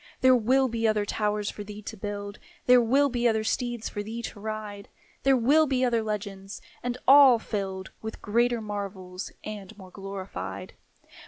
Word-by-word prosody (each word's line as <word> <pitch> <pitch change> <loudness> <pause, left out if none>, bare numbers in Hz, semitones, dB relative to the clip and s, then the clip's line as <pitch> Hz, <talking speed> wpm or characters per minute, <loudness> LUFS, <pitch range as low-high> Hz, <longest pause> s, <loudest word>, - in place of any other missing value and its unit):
There 260 0 +7
will 260 +3 +3
be 230 -2 0
other 215 -1 +1
towers 210 0 -1
for 205 - -7
thee 210 +1 -9
to 220 - -7
build; 205 0 -6 0.3
There 250 0 +7
will 270 +5 +3
be 245 -2 +1
other 220 -1 +1
steeds 240 0 -2
for 205 - -4
thee 225 +3 -6
to 210 - -7
ride; 210 -1 -6 0.3
There 270 -1 +4
will 295 +6 +4
be 260 -2 +1
other 235 -2 +2
legends, 200 -2 -5 0.2
and 245 0 -3
all 270 -2 +9
filled 195 -4 -4
With 220 0 -6
greater 235 +2 +1
marvels 195 -3 -6
and 210 -1 -8
more 190 -2 -12
glorified. 195 -1 -7
215 Hz, 170 wpm, -27 LUFS, 205-240 Hz, 0.3 s, all